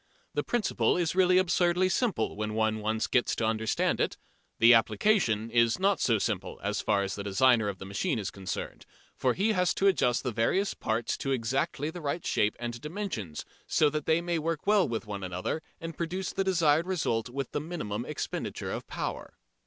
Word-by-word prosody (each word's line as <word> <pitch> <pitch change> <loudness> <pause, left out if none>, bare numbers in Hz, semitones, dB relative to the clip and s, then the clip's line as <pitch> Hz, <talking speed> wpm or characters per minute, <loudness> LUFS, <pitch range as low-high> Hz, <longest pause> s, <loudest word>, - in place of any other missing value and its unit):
The - - 0
principle 240 -6 +1
is 170 -3 0
really 185 0 +4
absurdly 180 0 +3
simple 185 - 0
when 105 +1 -3
one 110 0 +1
once 110 +1 -1
gets 125 - +1
to 115 - -1
understand 110 0 0
it. - - -1 0.4
The 115 +2 +7
application 115 - +2
is 115 -1 +3
not 195 +2 +2
so 115 -3 +3
simple - - -3
as - - -1
far 100 -2 +1
as 95 -1 -3
the 100 - -5
designer 110 +2 +3
of 100 - -5
the 95 - -9
machine 120 - -1
is 100 -3 -3
concerned, 95 -1 -6 0.3
for 130 -2 +1
he 210 +4 +2
has 180 -3 +1
to 195 - 0
adjust 125 -11 +3
the 125 - -1
various 150 - +1
parts 115 +1 -2
to 135 - -4
exactly 135 +5 -1
the 175 - -8
right 150 +3 -3
shape 105 - +1
and 120 0 -5
dimensions, 150 - -5 0.2
so 150 -1 +3
that 150 -1 -3
they 160 +1 +3
may 170 -1 -1
work 160 0 -2
well 205 -2 +4
with 115 0 -3
one 100 -2 -5
another 90 - -3 0.2
and 165 -1 -6
produce 180 +4 -3
the 195 - 0
desired 165 -3 +2
result 125 -11 -1
with 135 +1 -4
the - - -2
minimum 150 -10 -4
expenditure 150 +3 -4
of - - -5
power. - - -5
135 Hz, 195 wpm, -29 LUFS, 110-175 Hz, 0.4 s, The